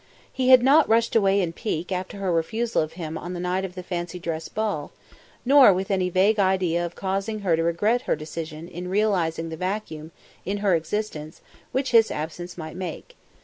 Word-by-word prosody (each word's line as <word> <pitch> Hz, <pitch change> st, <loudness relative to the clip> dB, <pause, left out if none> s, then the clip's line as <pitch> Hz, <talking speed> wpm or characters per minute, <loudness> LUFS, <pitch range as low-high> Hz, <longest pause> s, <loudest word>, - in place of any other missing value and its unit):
He 260 Hz, -1 st, 0 dB
had 255 Hz, -2 st, +8 dB
not 285 Hz, +4 st, +5 dB
rushed 230 Hz, +1 st, +2 dB
away 200 Hz, -2 st, +4 dB
in 170 Hz, -2 st, -2 dB
pique 180 Hz, -3 st, -4 dB
after 185 Hz, +2 st, -4 dB
her 195 Hz, -2 st, -1 dB
refusal 220 Hz, +8 st, 0 dB
of 155 Hz, 0 st, -4 dB
him 160 Hz, -2 st, -5 dB
on 175 Hz, +1 st, -6 dB
the -, -, -5 dB
night 180 Hz, +2 st, -1 dB
of 185 Hz, -1 st, -6 dB
the 180 Hz, -, -6 dB
fancy 175 Hz, 0 st, -4 dB
dress 165 Hz, -2 st, -4 dB
ball; 205 Hz, -9 st, -3 dB, 0.5 s
nor 270 Hz, -4 st, +8 dB
with 190 Hz, +2 st, -2 dB
any 185 Hz, -2 st, +1 dB
vague 195 Hz, +4 st, +3 dB
idea 185 Hz, -3 st, +2 dB
of 175 Hz, 0 st, -5 dB
causing 195 Hz, +3 st, -3 dB
her 180 Hz, -5 st, +2 dB
to 165 Hz, -, -1 dB
regret 190 Hz, +9 st, +1 dB
her -, -, +3 dB
decision 155 Hz, +1 st, -7 dB
in 180 Hz, 0 st, -7 dB
realising 180 Hz, -5 st, 0 dB
the 160 Hz, -, -6 dB
vacuum, 180 Hz, -4 st, -4 dB, 0.3 s
in 200 Hz, +2 st, -2 dB
her 195 Hz, -, +4 dB
existence 165 Hz, -2 st, -3 dB, 0.3 s
which 265 Hz, +1 st, -1 dB
his 225 Hz, -2 st, +6 dB
absence 170 Hz, +4 st, -6 dB
might 160 Hz, -1 st, -7 dB
make. 180 Hz, -3 st, -7 dB
185 Hz, 195 wpm, -24 LUFS, 165-210 Hz, 0.5 s, had